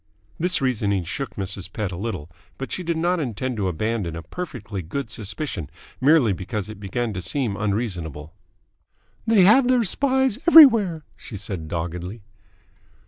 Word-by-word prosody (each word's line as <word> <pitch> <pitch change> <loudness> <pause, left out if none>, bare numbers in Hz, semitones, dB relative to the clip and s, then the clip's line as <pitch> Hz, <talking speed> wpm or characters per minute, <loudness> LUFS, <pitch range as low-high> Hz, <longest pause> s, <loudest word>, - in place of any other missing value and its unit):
This 180 -1 +2
reasoning 105 -7 0
shook 135 - -5
Mrs. 95 -1 -3
Pett 105 -4 -3
a - - -5
little, 95 -6 -4 0.3
but 135 - -6
she - - -2
did 170 -2 -2
not 175 +2 +1
intend 130 -2 -3
to 100 -2 0
abandon 95 0 -2
a 85 - -7
perfectly 105 - -6
good 110 - -5
suspicion 105 - -4 0.3
merely 135 -6 +5
because 100 +3 -5
it 110 -2 -9
began 110 +3 -3
to 95 - -4
seem 105 - -1
unreasonable. 90 - -3 0.9
"They 220 -4 +5
have 240 +7 +6
their 250 -2 +3
spies 265 +1 +1
everywhere," 225 - +8
she 105 - -9
said 95 -5 -5
doggedly. 90 +6 -5
110 Hz, 150 wpm, -23 LUFS, -, 0.9 s, everywhere